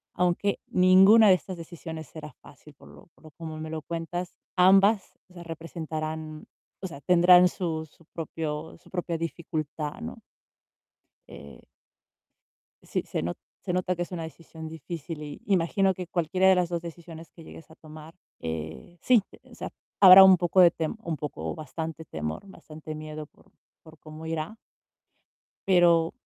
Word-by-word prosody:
Aunque 180 Hz, +3 st, 0 dB
ninguna 190 Hz, +4 st, +6 dB
de -, -, +8 dB
estas 180 Hz, +1 st, -7 dB
decisiones 160 Hz, -2 st, -8 dB
será 150 Hz, -1 st, -10 dB
fácil, 150 Hz, -, -16 dB
por -, -, -18 dB
lo -, -, -16 dB
por -, -, -26 dB
lo 155 Hz, -, -13 dB
como 160 Hz, 0 st, -8 dB
me 155 Hz, 0 st, -6 dB
lo 160 Hz, -, -4 dB
cuentas. 170 Hz, +2 st, -5 dB, 0.2 s
Ambas, 195 Hz, +2 st, +4 dB, 0.2 s
o -, -, -20 dB
sea, 175 Hz, -, -9 dB
representarán, 160 Hz, -1 st, -6 dB, 0.4 s
o -, -, -2 dB
sea, 145 Hz, -5 st, -11 dB
tendrán 180 Hz, +1 st, +6 dB
su 160 Hz, -4 st, -3 dB
su 160 Hz, +2 st, -25 dB
propio 160 Hz, -1 st, -5 dB
su -, -, -21 dB
propia 175 Hz, -2 st, -3 dB
dificultad, 155 Hz, 0 st, -5 dB
¿no? 235 Hz, +1 st, -7 dB, 1.1 s
Eh 70 Hz, 0 st, -13 dB, 1.2 s
Sí, -, -, -3 dB
se -, -, -3 dB
no 85 Hz, +2 st, -2 dB, 0.3 s
se 180 Hz, -, -3 dB
nota 180 Hz, 0 st, 0 dB
que 175 Hz, -, -2 dB
es 175 Hz, -, -12 dB
una 175 Hz, -2 st, -4 dB
decisión 160 Hz, 0 st, -10 dB
difícil 160 Hz, 0 st, -7 dB
y 145 Hz, -1 st, -9 dB
imagino 190 Hz, 0 st, +2 dB
que 180 Hz, -, -6 dB
cualquiera 175 Hz, +2 st, +1 dB
de 190 Hz, -, +7 dB
las 180 Hz, -2 st, +1 dB
2 170 Hz, -1 st, -2 dB
decisiones 165 Hz, -1 st, -10 dB
que 165 Hz, -, -15 dB
llegues 160 Hz, 0 st, -13 dB
a -, -, -15 dB
tomar, 155 Hz, +1 st, -13 dB, 0.3 s
eh, 80 Hz, -, -7 dB
sí, 240 Hz, -5 st, +4 dB, 0.3 s
o -, -, -15 dB
sea, -, -, -6 dB, 0.3 s
habrá 190 Hz, 0 st, +11 dB
un 190 Hz, -1 st, +8 dB
poco 175 Hz, +2 st, +3 dB
de 175 Hz, -, +8 dB
tem 160 Hz, +3 st, -4 dB
un 165 Hz, -, -3 dB
poco 80 Hz, -, -5 dB
o -, -, -6 dB
bastante 160 Hz, +2 st, -6 dB
temor, 75 Hz, -, -5 dB
bastante 155 Hz, -4 st, -10 dB
miedo 155 Hz, 0 st, -7 dB
por -, -, -26 dB, 0.3 s
por 160 Hz, -1 st, -16 dB
cómo 155 Hz, +1 st, -11 dB
irá 165 Hz, +6 st, -4 dB, 1.1 s
pero 170 Hz, -3 st, +4 dB
165 Hz, 165 wpm, -27 LUFS, 155-180 Hz, 1.2 s, habrá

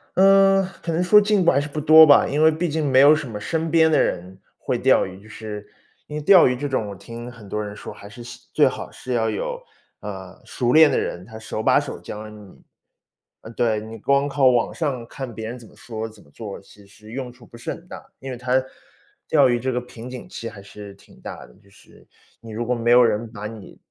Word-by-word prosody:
嗯， 195 Hz, 0 st, +5 dB, 0.2 s
可 165 Hz, -, -3 dB
能 175 Hz, +2 st, 0 dB
说 210 Hz, +3 st, +7 dB
进 205 Hz, -2 st, +2 dB
步 -, -, +5 dB
还 140 Hz, -, +2 dB
是 145 Hz, -, -3 dB
不 150 Hz, +1 st, -5 dB
多 155 Hz, +1 st, +9 dB
吧， 145 Hz, -, +6 dB
因 145 Hz, +2 st, -1 dB
为 160 Hz, -, +7 dB
毕 160 Hz, +2 st, -2 dB
竟 150 Hz, -2 st, -1 dB
没 130 Hz, 0 st, +5 dB
有 145 Hz, +2 st, +8 dB
什 150 Hz, -4 st, -3 dB
么 110 Hz, -, -6 dB
身 160 Hz, +10 st, -2 dB
边 160 Hz, 0 st, +4 dB
的 -, -, +4 dB
人 90 Hz, +2 st, -3 dB, 0.2 s
会 -, -, -2 dB
钓 -, -, +3 dB
鱼， 95 Hz, +1 st, -11 dB
就 105 Hz, -, -17 dB
是 105 Hz, -1 st, -8 dB, 0.4 s
因 150 Hz, -, -8 dB
为 150 Hz, -, -3 dB
钓 185 Hz, +2 st, +7 dB
鱼 125 Hz, -, 0 dB
这 145 Hz, +3 st, -4 dB
种 130 Hz, -6 st, -1 dB
我 100 Hz, -, -7 dB
听 120 Hz, +5 st, -9 dB
很 115 Hz, -4 st, -13 dB
多 105 Hz, -, -2 dB
人 105 Hz, 0 st, -7 dB
说， -, -, -9 dB
还 100 Hz, -, -13 dB
是 120 Hz, +4 st, -11 dB
希 120 Hz, -, -12 dB
最 -, -, +4 dB
好 -, -, -3 dB
是 125 Hz, -, -7 dB
要 110 Hz, -2 st, +1 dB
有， 485 Hz, -, -4 dB, 0.4 s
呃， -, -, -9 dB
熟 120 Hz, -2 st, -1 dB
练 155 Hz, +2 st, +7 dB
的 -, -, 0 dB
人， 90 Hz, -, -4 dB
他 110 Hz, +1 st, -11 dB
手 110 Hz, 0 st, -5 dB
把 -, -, +4 dB
手 -, -, -7 dB
教 105 Hz, +1 st, -8 dB
你。 105 Hz, -3 st, -15 dB, 0.8 s
呃， 110 Hz, -, -11 dB
对， 110 Hz, -2 st, 0 dB
你 110 Hz, +1 st, -9 dB
光 140 Hz, +4 st, +1 dB
靠 140 Hz, -2 st, +2 dB
网 120 Hz, -2 st, +2 dB
上 135 Hz, -7 st, -3 dB
看 130 Hz, -2 st, -7 dB
别 110 Hz, 0 st, -6 dB
人 125 Hz, +2 st, -7 dB
怎 115 Hz, -, -14 dB
么 -, -, -20 dB
说、 110 Hz, -1 st, -6 dB
怎 110 Hz, -1 st, -18 dB
么 70 Hz, -, -24 dB
做， 105 Hz, 0 st, -8 dB
其 100 Hz, 0 st, -19 dB
实 105 Hz, +2 st, -16 dB
用 125 Hz, -1 st, -5 dB
处 125 Hz, -1 st, -18 dB
不 120 Hz, -, -15 dB
是 120 Hz, -, -8 dB
很 170 Hz, -, -9 dB
大， -, -, -10 dB, 0.2 s
因 135 Hz, 0 st, -7 dB
为 125 Hz, -, -6 dB
他 130 Hz, +1 st, 0 dB, 0.6 s
钓 -, -, +4 dB
鱼 120 Hz, -1 st, +1 dB
这 130 Hz, +2 st, -2 dB
个 125 Hz, 0 st, -2 dB
瓶 125 Hz, 0 st, -11 dB
颈 125 Hz, -1 st, -9 dB
期 115 Hz, -, -7 dB
还 105 Hz, -3 st, -12 dB
是 100 Hz, -1 st, -11 dB
挺 -, -, -21 dB
大 -, -, -8 dB
的， -, -, -20 dB
就 100 Hz, -, -24 dB
是 100 Hz, -, -21 dB, 0.3 s
你 115 Hz, -1 st, -12 dB
如 115 Hz, +2 st, -4 dB
果 125 Hz, -, 0 dB
没 120 Hz, -1 st, -1 dB
有 125 Hz, +1 st, +7 dB
人 115 Hz, 0 st, 0 dB
把 105 Hz, -2 st, -8 dB
你 110 Hz, -3 st, -12 dB
120 Hz, 270 characters per minute, -22 LUFS, 110-145 Hz, 0.8 s, 多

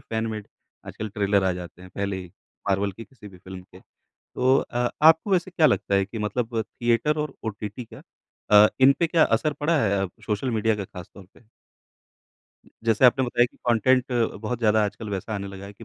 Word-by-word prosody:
Fan 110 Hz, 0 st, -1 dB
made 105 Hz, -2 st, -6 dB, 0.4 s
आजकल 110 Hz, -, -6 dB
trailer 100 Hz, -1 st, +1 dB
आ 95 Hz, -, +2 dB
जाते 90 Hz, +1 st, -11 dB
हैं 95 Hz, -, -13 dB
पहले 100 Hz, -1 st, -2 dB
ही 90 Hz, -, -14 dB, 0.4 s
मार्वल 100 Hz, 0 st, 0 dB
की 115 Hz, +4 st, -10 dB
किसी 105 Hz, -6 st, -14 dB
भी 95 Hz, -, -15 dB
फ़िल्म 95 Hz, +1 st, -10 dB
के। 95 Hz, 0 st, -17 dB
तो 130 Hz, +1 st, -2 dB
अ, 120 Hz, 0 st, -1 dB
आपको 160 Hz, +5 st, +5 dB
वैसे 185 Hz, 0 st, +1 dB
क्या 165 Hz, -3 st, +3 dB
लगता 100 Hz, -, +1 dB
है 100 Hz, 0 st, +3 dB
कि 110 Hz, +3 st, -8 dB
मतलब 110 Hz, +2 st, -2 dB
थिएटर 120 Hz, +8 st, 0 dB
और 150 Hz, -2 st, -3 dB
ओटीटी 110 Hz, +2 st, -5 dB
का -, -, -12 dB, 0.5 s
अ, 105 Hz, 0 st, +8 dB
इन 135 Hz, +1 st, +7 dB
पे 170 Hz, -, +2 dB
क्या 165 Hz, -1 st, +4 dB
असर 130 Hz, +7 st, +1 dB
पड़ा 160 Hz, +1 st, +2 dB
है 100 Hz, -2 st, +1 dB
अ, -, -, -13 dB, 0.2 s
सोशल 105 Hz, +4 st, -1 dB
मीडिया 110 Hz, -1 st, +1 dB
का 100 Hz, -, -4 dB
ख़ास 90 Hz, -2 st, -11 dB
तौर 95 Hz, -, -13 dB
पे। -, -, -21 dB, 1.4 s
जैसे 115 Hz, +2 st, +2 dB
आपने 130 Hz, +1 st, +5 dB
बताया 120 Hz, 0 st, +2 dB
कि -, -, -26 dB
कॉन्टेंट 125 Hz, +2 st, +3 dB, 0.4 s
बहुत 120 Hz, +2 st, -3 dB
ज़्यादा 110 Hz, -2 st, +3 dB
आजकल 105 Hz, +2 st, -5 dB
वैसा 100 Hz, +3 st, -4 dB
आने 100 Hz, -1 st, -4 dB
लगा 95 Hz, 0 st, -9 dB
है 100 Hz, -, -10 dB
कि 115 Hz, -, -14 dB
110 Hz, 210 wpm, -24 LUFS, 100-125 Hz, 1.4 s, अ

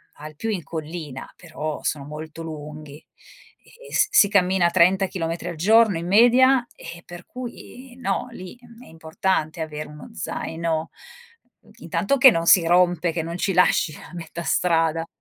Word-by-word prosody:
al 155 Hz, +1 st, -11 dB
più 225 Hz, +9 st, -4 dB
in 195 Hz, -6 st, -3 dB
collina, 155 Hz, -4 st, -7 dB
però 155 Hz, -3 st, -6 dB
sono 145 Hz, -2 st, -2 dB
molto 155 Hz, +2 st, -9 dB
lunghi 150 Hz, -2 st, -9 dB, 0.7 s
e 485 Hz, 0 st, -16 dB
s 420 Hz, -, +3 dB
si 205 Hz, -, +5 dB
cammina 190 Hz, -3 st, +2 dB
30 185 Hz, +2 st, +4 dB
chilometri 165 Hz, -2 st, -4 dB
al 170 Hz, -, -6 dB
giorno 215 Hz, +3 st, +4 dB
in 170 Hz, +1 st, -5 dB
media, 245 Hz, +5 st, +5 dB
eh, 170 Hz, 0 st, -11 dB
per 175 Hz, 0 st, -11 dB
cui, 250 Hz, 0 st, -10 dB
no! 235 Hz, -2 st, -2 dB
Lì, 185 Hz, -2 st, -10 dB
uhm, 235 Hz, 0 st, -16 dB
è -, -, -17 dB
importante 160 Hz, 0 st, -2 dB
avere 150 Hz, -1 st, -5 dB
uno 150 Hz, 0 st, -12 dB
zaino, 160 Hz, -1 st, -3 dB, 0.7 s
uhm, 215 Hz, -, -22 dB
intanto 195 Hz, -, -1 dB
che 265 Hz, -1 st, +8 dB
non 165 Hz, -3 st, -1 dB
si 175 Hz, -1 st, +6 dB
rompe, 175 Hz, -1 st, +2 dB
che 165 Hz, -, -2 dB
non 170 Hz, +2 st, -5 dB
ci 195 Hz, -, -1 dB
lasci 180 Hz, -3 st, +3 dB
a -, -, -13 dB
metà 170 Hz, -1 st, -7 dB
strada. 165 Hz, -2 st, +1 dB
170 Hz, 165 wpm, -23 LUFS, 160-200 Hz, 0.7 s, che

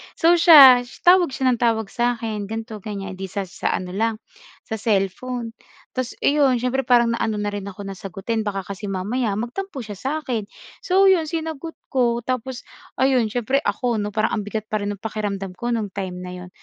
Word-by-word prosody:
So, 340 Hz, +1 st, +4 dB
siya, 275 Hz, -7 st, +9 dB, 0.2 s
tawag 355 Hz, -4 st, +5 dB
siya 260 Hz, -1 st, +1 dB
ng 240 Hz, -, -1 dB
tawag 225 Hz, -3 st, +1 dB
sa 240 Hz, 0 st, +1 dB
akin, 220 Hz, -3 st, -4 dB
ganito, 225 Hz, +1 st, -5 dB
ganiyan, 195 Hz, -2 st, -6 dB
'di 195 Hz, -, -5 dB
sa 195 Hz, +2 st, -3 dB
sa -, -, -2 dB
ano 185 Hz, -, -4 dB
lang, 220 Hz, +4 st, 0 dB, 0.5 s
sa 220 Hz, -, -4 dB
cellphone. 225 Hz, +3 st, -1 dB, 0.5 s
Tapos 255 Hz, -1 st, -2 dB
eh, 290 Hz, -, +3 dB
'yon, 265 Hz, -5 st, +3 dB
siyempre 260 Hz, +2 st, 0 dB
parang 240 Hz, -2 st, +4 dB
naano 215 Hz, -2 st, -1 dB
na 205 Hz, -, -1 dB
rin 205 Hz, -1 st, -5 dB
ako 200 Hz, 0 st, -8 dB
na 195 Hz, -1 st, -7 dB
sagutin 195 Hz, +4 st, -4 dB
baka 195 Hz, -2 st, -2 dB
kasi 200 Hz, +2 st, -7 dB
mamaya 205 Hz, +4 st, -1 dB
magtampo 265 Hz, -, -4 dB
siya 210 Hz, -3 st, -8 dB
sa 265 Hz, +8 st, -3 dB
'kin. 235 Hz, -8 st, -3 dB, 0.4 s
So, 385 Hz, +1 st, +5 dB
'yon, 355 Hz, -4 st, +4 dB
sinagot 320 Hz, 0 st, -4 dB, 0.2 s
ko. 240 Hz, -3 st, +1 dB
Tapos, 255 Hz, +1 st, -3 dB, 0.4 s
ayun, 260 Hz, -3 st, +3 dB
siyempre 245 Hz, +2 st, +1 dB
ako 245 Hz, -3 st, 0 dB
'no, 210 Hz, -1 st, -3 dB
parang 220 Hz, +2 st, 0 dB
ang 210 Hz, -, -2 dB
bigat 215 Hz, +1 st, -5 dB
pa 215 Hz, -, 0 dB
rin 205 Hz, 0 st, -3 dB
ng 200 Hz, -, -12 dB
pakiramdam 200 Hz, -4 st, -4 dB
ko 240 Hz, 0 st, -2 dB
no'ng 220 Hz, -3 st, -2 dB
time 185 Hz, -2 st, -5 dB
na 180 Hz, -, -7 dB
'yon. 180 Hz, 0 st, -10 dB
225 Hz, 200 wpm, -22 LUFS, 205-255 Hz, 0.5 s, siya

